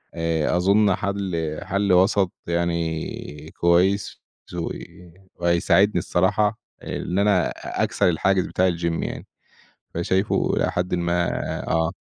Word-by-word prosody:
آآ 80 Hz, 0 st, 0 dB
أظن 100 Hz, +2 st, +3 dB
حل 95 Hz, -6 st, -3 dB
حل 100 Hz, -1 st, +1 dB
وسَط 95 Hz, 0 st, +3 dB, 0.2 s
يعني 85 Hz, -3 st, -3 dB
كويّس 90 Hz, +3 st, +2 dB, 0.3 s
و 85 Hz, -, -2 dB, 0.7 s
وهيساعدني 85 Hz, +3 st, +3 dB
الصراحة 105 Hz, +5 st, +1 dB, 0.2 s
إن 90 Hz, +3 st, -3 dB
أنا 100 Hz, -3 st, +3 dB
أ -, -, -4 dB
أكسَر -, -, +2 dB
الحاجز 90 Hz, +2 st, +1 dB
بتاع 95 Hz, +1 st, +2 dB
الgym 85 Hz, 0 st, -7 dB, 0.2 s
يعني. -, -, -6 dB, 0.7 s
فشايفه 95 Hz, +4 st, 0 dB
إلى -, -, +1 dB
حدٍ 90 Hz, +1 st, -1 dB
ما 85 Hz, 0 st, 0 dB, 0.4 s
آه. 80 Hz, 0 st, +1 dB
90 Hz, 115 wpm, -23 LUFS, 85-95 Hz, 0.7 s, أظن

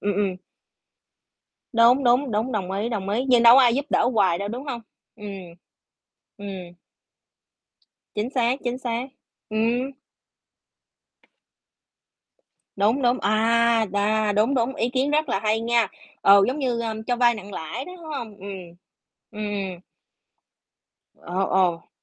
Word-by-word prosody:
ừm, 205 Hz, -1 st, -1 dB
ừm. 195 Hz, -2 st, -1 dB, 1.4 s
Đúng, 240 Hz, +3 st, +5 dB
đúng, 250 Hz, +2 st, +3 dB
đúng, 220 Hz, +4 st, -1 dB
đồng 190 Hz, -3 st, -2 dB
ý, 205 Hz, +4 st, -2 dB
đồng 200 Hz, -5 st, -4 dB
ý, 225 Hz, +6 st, 0 dB
nhưng 245 Hz, -2 st, +5 dB
đâu 235 Hz, +2 st, +9 dB
có -, -, +8 dB
ai 240 Hz, -2 st, +4 dB
giúp 280 Hz, +1 st, -1 dB
đỡ -, -, +3 dB
hoài 185 Hz, -5 st, +3 dB
đâu, 200 Hz, 0 st, -4 dB
đúng 250 Hz, +5 st, -6 dB
hông? 240 Hz, -4 st, -4 dB, 0.4 s
Ừm, 210 Hz, -, -9 dB, 1.1 s
ừm. 190 Hz, -4 st, -8 dB, 1.4 s
Chính 215 Hz, +4 st, -2 dB
xác, 250 Hz, 0 st, +1 dB
chính 245 Hz, +1 st, -2 dB
xác. 245 Hz, 0 st, -3 dB, 0.4 s
Ừm. 235 Hz, +4 st, 0 dB, 2.9 s
Đúng, 220 Hz, +7 st, +2 dB
đúng, 245 Hz, +1 st, +2 dB
à, 225 Hz, +2 st, +2 dB
đà, 210 Hz, +1 st, +1 dB
đúng, 215 Hz, +7 st, +2 dB
đúng, 250 Hz, +1 st, 0 dB
ý 240 Hz, -4 st, -1 dB
kiến 265 Hz, +3 st, 0 dB
rất 305 Hz, 0 st, +1 dB
là 195 Hz, -, 0 dB
hay 215 Hz, +1 st, +1 dB
nha! 235 Hz, -2 st, +2 dB, 0.3 s
Ừ, 200 Hz, 0 st, +7 dB
giống 260 Hz, +4 st, -2 dB
như, 245 Hz, -4 st, -1 dB
ơ, 225 Hz, -1 st, -3 dB
cho 245 Hz, -, 0 dB
vay 240 Hz, -1 st, +4 dB
nặng 205 Hz, -1 st, -10 dB
lãi 190 Hz, -, -5 dB
đó, 360 Hz, -, -10 dB
đúng 340 Hz, -, -14 dB
hông? 240 Hz, -9 st, -6 dB
Ừm. 200 Hz, 0 st, -10 dB, 0.8 s
Ừm, 215 Hz, -1 st, -6 dB
ừm. 190 Hz, -3 st, -4 dB, 1.4 s
Ờ, 185 Hz, +3 st, -2 dB
ồ. 180 Hz, -3 st, +1 dB
230 Hz, 145 wpm, -24 LUFS, 205-245 Hz, 2.9 s, đâu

